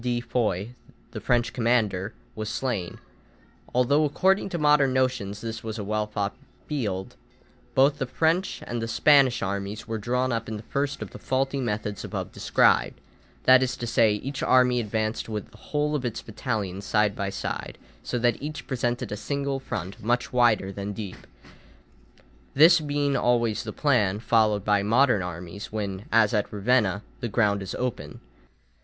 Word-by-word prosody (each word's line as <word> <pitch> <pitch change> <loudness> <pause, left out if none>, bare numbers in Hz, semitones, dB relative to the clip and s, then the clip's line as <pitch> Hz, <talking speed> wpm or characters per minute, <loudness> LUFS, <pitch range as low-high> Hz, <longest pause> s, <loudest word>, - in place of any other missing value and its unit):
de 120 -1 0
Foix, 115 -4 -1 0.4
the - - -6
French 120 -1 +1
commander, 115 -5 +1 0.2
was 110 -1 -4
slain, 110 -7 -3 0.7
although 135 +5 +3
according 190 +7 +2
to 175 - -3
modern 150 -3 +4
notions 125 -6 0
this 115 -1 -5
was 110 0 -5
a 105 - -4
well 105 +1 -1
fought 105 -1 -3 0.3
field, 105 -11 -3 0.6
both 140 +2 +4
the 135 - -1
French 165 +7 0
and 120 -1 -3
the 115 - -2
Spanish 130 +1 +4
armies 100 +3 -4
were 110 -1 -3
drawn 125 +4 0
up 115 -1 -2
in 110 - -4
the 105 - -9
first 140 +4 -2
of - - -10
the - - -10
faulty 135 +1 -1
methods 105 -3 -3
above - - -5
described; - - +2 0.4
that 130 0 +7
is 125 -1 -1
to 120 - -4
say, 115 -2 +3
each 135 +7 -4
army 125 -1 +4
advanced 110 0 -2
with 105 -2 -5
the - - -16
whole 150 0 0
of 145 -3 -1
its 120 -2 -3
battalions 105 -4 -3
side 105 -1 +1
by 100 0 -2
side, 100 - -5 0.2
so 125 - -3
that 120 -1 +1
each 150 +1 -6
presented 120 -2 -2
a - - -2
single 140 +4 -2
front 100 -7 -6
much 120 +3 0
wider 115 -6 +3
than 100 +1 -5
deep; 100 -2 -8 1.3
this 165 +5 +7
being 145 -2 0
always 120 -4 +1
the - - -5
plan 110 -10 +2
followed 110 -3 +2
by 105 -1 +3
modern 115 +1 +3
armies 90 +2 -7
when, 100 -2 -4
as 110 -1 +4
at 105 -2 0
Ravenna, 105 -2 +1 0.2
the 120 - -3
ground 100 -1 +2
is 95 -1 -5
open. 115 -13 -4
115 Hz, 170 wpm, -26 LUFS, 105-130 Hz, 1.3 s, that